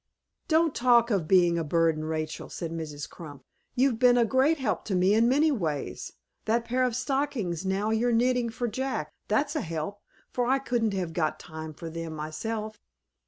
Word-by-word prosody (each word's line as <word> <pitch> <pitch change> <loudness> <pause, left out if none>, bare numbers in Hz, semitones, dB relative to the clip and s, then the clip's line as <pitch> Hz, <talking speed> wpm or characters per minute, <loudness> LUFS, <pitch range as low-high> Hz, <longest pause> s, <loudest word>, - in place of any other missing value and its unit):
"Don't 320 -1 +3
talk 240 -1 +4
of 185 -7 0
being 175 -2 +4
a - - -1
burden, 160 0 +1
Rachel," 155 0 -4
said 165 -1 -5
Mrs. 150 -3 -5
Crump. 145 -5 -11 0.3
"You've 250 -2 +2
been 250 -1 +5
a 235 - +4
great 265 +7 +3
help 260 -6 -1
to 195 - -1
me 185 +2 +4
in 230 +2 +4
many 300 +4 +4
ways. 160 - -3 0.3
That 230 +2 +1
pair 250 +2 0
of 250 -3 0
stockings 250 - -1
now 200 +3 0
you're 235 +2 +2
knitting 245 +1 +2
for 240 +2 -3
Jack 260 +4 -3
that's 290 +2 +1
a 305 - 0
help, 165 +5 -4 0.3
for 245 -1 0
I 265 +2 +4
couldn't 235 -6 -1
have 180 -4 -3
got 155 -3 -1
time 160 -1 -8
for 165 - -8
them 165 -1 -5
myself." 215 +8 -4
215 Hz, 185 wpm, -27 LUFS, 165-250 Hz, 0.3 s, been